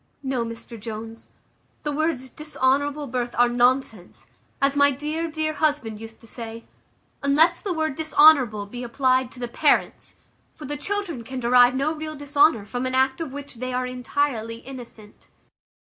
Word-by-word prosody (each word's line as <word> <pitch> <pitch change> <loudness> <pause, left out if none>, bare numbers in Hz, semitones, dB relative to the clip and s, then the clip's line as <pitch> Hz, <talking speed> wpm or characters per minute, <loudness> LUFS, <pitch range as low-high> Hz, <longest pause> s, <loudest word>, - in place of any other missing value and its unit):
No, 260 -3 -1
Mr 230 0 -8
Jones, 225 +1 -8 0.5
the 295 - -2
words 285 -4 -1
`dishonourable 285 -1 -1
birth' 245 -1 -2
are 245 0 +5
nonsense, 240 -5 0 0.3
as 275 0 +2
my 285 0 +5
dear, 305 +4 -3
dear 310 0 -1
husband 285 -8 -1
used 225 0 -10
to - - -15
say, 230 0 -8 0.6
unless 315 +5 +3
the 400 - -3
word 315 -4 -1
`dishonourable' 290 -9 +5
be 245 - -6
applied 255 +1 +1
to 250 - -13
the 245 - -3
parents; 285 +5 +1 0.4
for 300 - -10
the 290 - -4
children 345 - -3
can 260 +3 -6
derive 245 +1 +5
no 280 +4 0
real 310 0 -6
dishonour 285 -5 +3
from 245 +4 -3
an 255 - -2
act 265 +3 +2
of 315 -5 -4
which 285 -2 -8
they 255 +1 -4
are 250 0 -1
intirely 250 -2 -2
innocent." 240 -5 -12
260 Hz, 165 wpm, -24 LUFS, 240-295 Hz, 0.6 s, are